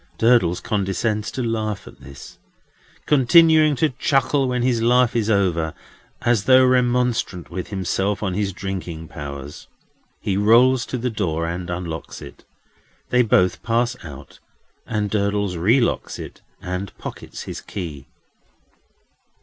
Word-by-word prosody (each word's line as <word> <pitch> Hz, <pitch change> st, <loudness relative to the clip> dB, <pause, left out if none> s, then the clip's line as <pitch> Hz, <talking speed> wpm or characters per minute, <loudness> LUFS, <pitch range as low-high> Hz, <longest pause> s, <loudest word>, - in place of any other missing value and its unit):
Durdles 115 Hz, -7 st, +3 dB
condescends 105 Hz, 0 st, -1 dB
to 130 Hz, -, -4 dB
laugh 110 Hz, -3 st, -2 dB
at -, -, -14 dB
this. 70 Hz, 0 st, -12 dB, 0.7 s
Continuing 155 Hz, +2 st, +5 dB
to 155 Hz, +4 st, +2 dB
chuckle 135 Hz, +1 st, +1 dB
when 125 Hz, -1 st, -1 dB
his 120 Hz, -2 st, +1 dB
laugh 120 Hz, +1 st, +3 dB
is 110 Hz, -2 st, 0 dB
over, 90 Hz, -6 st, +1 dB, 0.5 s
as 115 Hz, -4 st, +2 dB
though 130 Hz, 0 st, +6 dB
remonstrant 125 Hz, -8 st, +1 dB
with 90 Hz, +1 st, -5 dB
himself 95 Hz, +1 st, -2 dB
on 95 Hz, -3 st, -1 dB
his 100 Hz, +1 st, -1 dB
drinking 90 Hz, -4 st, -6 dB
powers, 70 Hz, -1 st, -8 dB, 0.5 s
he 100 Hz, -, -2 dB
rolls 120 Hz, +4 st, +4 dB
to 130 Hz, -, -3 dB
the 125 Hz, +1 st, -2 dB
door 85 Hz, -7 st, -2 dB
and 85 Hz, +1 st, -4 dB
unlocks 85 Hz, -2 st, -5 dB
it. -, -, -12 dB, 0.7 s
They 125 Hz, -, +4 dB
both 90 Hz, -5 st, +2 dB
pass 120 Hz, +2 st, 0 dB
out, 70 Hz, -5 st, -11 dB, 0.5 s
and 105 Hz, -2 st, -1 dB
Durdles 100 Hz, -2 st, -1 dB
relocks 115 Hz, +9 st, +1 dB
it, -, -, -9 dB, 0.2 s
and 90 Hz, +1 st, -5 dB
pockets -, -, -8 dB
his -, -, -7 dB
key. 75 Hz, -8 st, -7 dB
105 Hz, 135 wpm, -21 LUFS, 90-125 Hz, 0.7 s, though